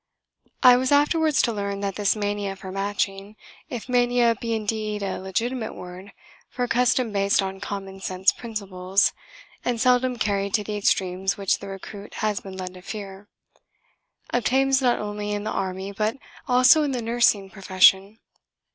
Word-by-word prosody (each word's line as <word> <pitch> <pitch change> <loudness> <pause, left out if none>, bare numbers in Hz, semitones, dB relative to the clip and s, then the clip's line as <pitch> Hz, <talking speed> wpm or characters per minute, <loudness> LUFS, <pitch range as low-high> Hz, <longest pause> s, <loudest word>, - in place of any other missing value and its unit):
I 250 -1 +8
was 255 +1 0
afterwards 295 +1 +3
to 235 - +1
learn 200 -1 -3
that 200 -1 -2
this 205 +2 +1
mania 205 -1 -2
for 190 -1 -9
matching 195 +1 -3 0.3
(if 240 -2 -6
mania 245 -1 +3
be 230 +1 -3
indeed 215 -1 -2
a 195 - -3
legitimate 220 +5 -3
word 180 +2 -10 0.4
for 250 - -3
a - - 0
custom 250 -1 +2
based 200 0 +2
on 195 -1 -2
common 195 -1 -6
sense 190 +1 +2
principles 195 -4 -1 0.5
and 240 -2 -1
seldom 250 +1 +2
carried 200 -2 0
to 210 - 0
the 210 +1 -4
extremes 190 -1 0
which 195 -2 0
the 200 - -9
recruit 200 +1 -9
has 210 -2 -1
been 190 -1 -10
led 185 -1 -6
to 185 - -12
fear) 200 0 -8 1.0
obtains 265 +3 +2
not 245 -2 +3
only 210 0 -4
in 205 0 -3
the 215 - -3
army 190 +1 -3
but 215 +4 -1 0.3
also 255 +5 +6
in 290 -2 0
the 245 - -2
nursing 225 -4 +2
profession. 195 +1 +3
205 Hz, 165 wpm, -24 LUFS, 195-240 Hz, 1.0 s, I